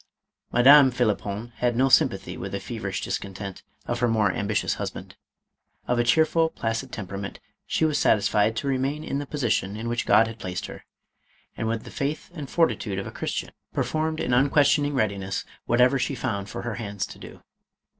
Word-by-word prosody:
Madame 135 +3 +8
Phlippon 110 -2 -1
had 120 -1 +1
no 130 +3 +3
sympathy 135 - +3
with - - -6
the - - -1
fever - - -6
ish - - -3
discontent 100 0 -5 0.2
of 120 0 -2
her 120 - +2
more 110 -4 +2
ambitious 105 +2 0
husband. - - -6 0.7
Of 125 -1 +1
a - - +4
cheerful, 160 +5 +3
placid 115 -1 -3
temperament, 100 -1 -6 0.3
she 160 - +1
was 150 -2 +1
satisfied 105 +1 +3
to 140 - -3
re 135 -1 +1
main 145 +4 -2
in 140 - -2
the 145 - -5
position 115 -8 -1
in 115 +2 -5
which 120 0 -2
God 110 +2 +6
had 115 0 -8
placed 90 -3 -4
her, - - -10 0.7
and 115 - -3
with 115 0 -2
the - - -10
faith 145 +5 -3
and 150 -6 -7
fortitude 120 - +1
of 95 - -3
a - - -6
Christian, - - -4 0.2
performed 155 0 -1
in - - 0
unquestioning 145 +2 +3
readiness 100 -5 -1 0.2
whatever 125 +3 +4
she 135 - -1
found 100 -7 -3
for - - -6
her 120 -2 -3
hands 100 -2 -3
to - - -12
do. - - -12
120 Hz, 185 wpm, -25 LUFS, 105-140 Hz, 0.7 s, Madame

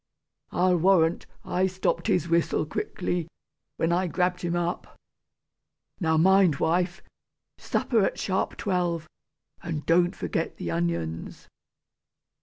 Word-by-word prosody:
I'll 180 0 +3
warrant, 175 -2 +3 0.2
I 185 +1 +1
stopped 190 +3 -1
his 180 -6 +1
whistle 170 -2 +1
quickly, 175 +2 -3 0.5
when 165 - +1
I 180 +2 +1
grabbed 180 +2 0
him 175 -1 -1
up! 175 0 -3 1.0
Now 160 -4 +2
mind, 190 -1 +5
wife, 175 +5 0 0.6
supper 225 -5 +1
at - - 0
sharp 190 -1 -1
twelve, 175 -5 -1 0.5
and 160 -3 -4
don't 175 +1 +3
forget - - -3
the 85 - -4
onions!" 85 -1 -3
175 Hz, 115 wpm, -26 LUFS, 160-185 Hz, 1.0 s, mind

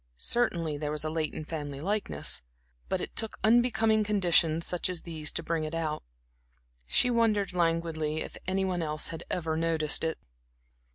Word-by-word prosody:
Certainly, 165 - 0
there 150 -1 -2
was 150 0 0
a 155 - -2
latent 155 -1 -3
family 145 -4 -5
likeness; 180 - +2 0.5
but - - 0
it - - -6
took 225 -1 -1
unbecoming 225 -1 +4
conditions 175 -5 +3
such 180 +1 +1
as 180 -2 -3
these 160 -3 -3
to 165 - -1
bring 165 -1 -1
it 155 +1 -4
out. 160 -2 -2 0.9
She 250 - +3
wondered 215 -5 +2
languidly 165 -3 0
if - - -6
any 190 +1 +1
one 180 -2 -1
else 155 -2 -2
had 165 - -7
ever 160 -3 -1
noticed 160 -2 +1
it. 160 0 -1
165 Hz, 165 wpm, -29 LUFS, 155-195 Hz, 0.9 s, unbecoming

